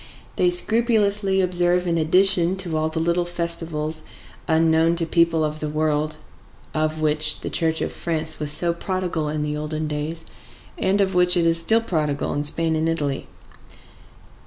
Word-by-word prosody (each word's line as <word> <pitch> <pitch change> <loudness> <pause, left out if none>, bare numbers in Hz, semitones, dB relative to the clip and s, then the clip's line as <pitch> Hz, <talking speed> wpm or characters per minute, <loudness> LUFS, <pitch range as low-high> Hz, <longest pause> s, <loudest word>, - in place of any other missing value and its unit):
They 180 - +2
scrupulously 205 0 +2
observe 180 0 +1
in 170 -1 0
addition 180 +2 +4 0.2
all 155 0 0
the 160 +1 -3
little 170 +2 +1
festivals 165 -3 -2 0.5
unknown 160 +1 +3
to 170 -1 -1
people 165 -1 +2
of 155 0 -4
the 155 - -4
world, 155 0 -1 0.6
of 155 0 -1
which 155 0 0
the - - -5
Church 160 -1 0
of - - -3
France 160 -2 -3
was 150 -1 -1
so 170 +2 +2
prodigal 175 -3 -3
in 150 0 -2
the 150 0 -3
olden 155 +1 -4
days, 150 +2 -3 0.5
and 200 - +1
of 190 -1 0
which 180 0 +4
it 170 - +2
is 165 0 +3
still 225 +6 +2
prodigal 150 -9 -2
in 145 - -2
Spain 160 +2 +1
and 160 +1 0
Italy. 145 -4 -2
165 Hz, 160 wpm, -22 LUFS, 155-180 Hz, 0.6 s, addition